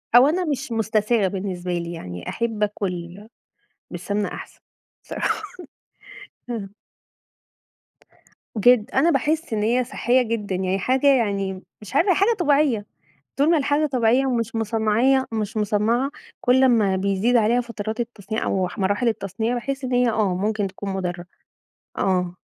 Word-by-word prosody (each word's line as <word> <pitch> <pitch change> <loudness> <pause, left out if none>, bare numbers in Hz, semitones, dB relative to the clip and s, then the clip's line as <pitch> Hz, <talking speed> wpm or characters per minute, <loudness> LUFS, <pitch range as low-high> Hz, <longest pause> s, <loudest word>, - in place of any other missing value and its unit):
أو 250 +3 +8
أنا 355 +4 0
مش 275 -4 -3
مُستساغ 220 -1 +1
بالنسبة 185 -2 -4
لي 170 0 -3
يعني 90 - -7
أحب 225 -2 -2
اكل 190 -1 -4 0.6
بالسمنة 200 +4 -2
أحسن، - - -9 0.4
صراحة - - -2 1.1
اهم. 205 -4 -5 1.8
جدًا، 240 +2 +4
أنا 330 +5 +4
باحس 315 -4 0
إن 210 - 0
هي 240 +4 +2
صحّية 245 +1 +1
جدًا 220 -5 -2
يعني، 185 +1 -1
حاجة 260 +7 +1
يعني 195 -5 -1 0.2
مش 195 -3 -10
عارفة 375 +3 +4
هي - - +3
حاجة 400 +4 +3
طبيعية، 285 - +2 0.5
طول 285 +4 +3
ما 340 - +5
الحاجة 290 +2 +1
طبيعية 255 -1 +2
ومش 230 -3 -1
مُصنّعية 225 +4 +2
مش 220 -1 -3
مصنّعة، 215 +5 +1 0.3
كل 260 +1 +4
أمّا 220 -7 +3
بيزيد 200 +5 +1
عليها 235 +2 +3
فترات 225 -2 -5
التصنيع 220 -2 -4
أو 190 -1 0
أح 180 - -9
مراحل 205 +5 +1
التصنيع، 220 +2 -2
باحس 265 +2 -4
إن 255 - -3
هي، 245 0 +3
آه 210 -4 +1
ممكن 210 +2 -1
تكون 195 +1 -6
مُضرّه، 180 -2 -3 0.7
آه. 180 -2 0
220 Hz, 145 wpm, -23 LUFS, 195-250 Hz, 1.8 s, أو